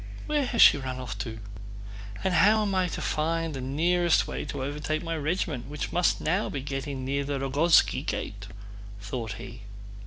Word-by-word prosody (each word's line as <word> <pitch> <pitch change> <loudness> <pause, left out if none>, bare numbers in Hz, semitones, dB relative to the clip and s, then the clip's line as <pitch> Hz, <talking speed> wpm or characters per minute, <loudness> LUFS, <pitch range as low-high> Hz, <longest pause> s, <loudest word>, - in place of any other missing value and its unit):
Where 295 -3 0
has 235 - +5
she - - +7
run 130 -1 -4
off 130 - -5
to? 115 -2 -5 0.9
And 190 -1 +1
how 215 +5 +5
am 200 -2 -1
I 185 -1 +2
to - - -5
find 165 +1 -1
the 135 - -5
nearest 170 +6 +2
way - - -4
to 140 -2 -4
overtake 150 +3 -3
my 165 0 -2
regiment, 150 -4 -2
which 150 +1 -4
must 175 0 +2
by - - -9
now 180 +7 +1
be 140 - -4
getting 135 -1 -4
near 140 +1 -1
the 140 0 -2
Rogózhski 140 +5 +3
gate?" - - -4 0.5
thought 110 0 -5
he. 120 +2 -9
150 Hz, 185 wpm, -27 LUFS, 135-175 Hz, 0.9 s, she